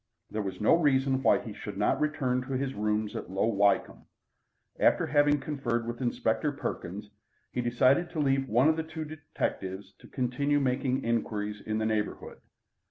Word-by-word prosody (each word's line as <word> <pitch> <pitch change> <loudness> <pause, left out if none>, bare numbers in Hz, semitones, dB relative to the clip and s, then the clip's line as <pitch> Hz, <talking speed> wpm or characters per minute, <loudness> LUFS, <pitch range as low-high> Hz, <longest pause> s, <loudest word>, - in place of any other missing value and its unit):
There 110 - -2
was 95 -2 -5
no 105 - +4
reason 135 -5 +3
why - - +5
he - - -7
should - - -7
not - - +2
return 140 -5 0
to 135 - -3
his 135 +1 -1
rooms 105 0 -1
at - - -5
Low 95 +1 0
Wycombe. 100 -3 +1 0.7
After - - +4
having 145 0 +3
conferred 120 -6 -2
with 120 +2 -5
Inspector 120 +2 0
Perkins, 105 -7 -5 0.4
he 125 - -1
decided 130 +8 +3
to 160 - -5
leave 135 -2 +1
one 120 +6 +4
of 160 0 +3
the - - 0
two 160 0 -6
detectives 100 -10 -4
to - - -15
continue 140 +3 0
making 130 0 0
inquiries 105 -3 -2
in 110 0 -2
the 110 - 0
neighbourhood. 110 -1 -2
125 Hz, 170 wpm, -29 LUFS, 110-145 Hz, 0.7 s, why